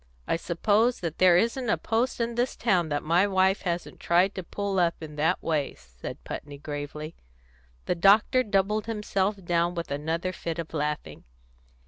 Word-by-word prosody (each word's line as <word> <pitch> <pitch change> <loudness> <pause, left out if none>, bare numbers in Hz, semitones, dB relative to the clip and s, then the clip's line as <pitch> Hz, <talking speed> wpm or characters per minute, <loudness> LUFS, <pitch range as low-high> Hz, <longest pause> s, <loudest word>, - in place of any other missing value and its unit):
"I - - +1
suppose 210 +8 +1
that 165 -3 -4
there 180 -2 +6
isn't 235 +4 0
a - - +3
post 230 +4 -1
in 235 0 -1
this 245 +2 -1
town 180 -8 +1
that 145 -1 -1
my 175 +5 +3
wife 190 0 +2
hasn't 175 -2 -3
tried 180 +3 +3
to 190 - -4
pull 195 +2 -2
up 170 -1 +2
in 155 -2 -8
that 160 +5 +1
way," 155 -4 -1
said - - -10
Putney 145 -1 -7
gravely. 150 +2 -6 0.7
The - - +1
doctor 200 +8 +5
doubled 210 -1 0
himself 210 -2 -1
down 170 +1 +1
with 170 -4 -4
another 160 +5 -2
fit 165 -2 -4
of 165 -1 -6
laughing. 150 - -3
175 Hz, 170 wpm, -27 LUFS, 160-205 Hz, 0.7 s, there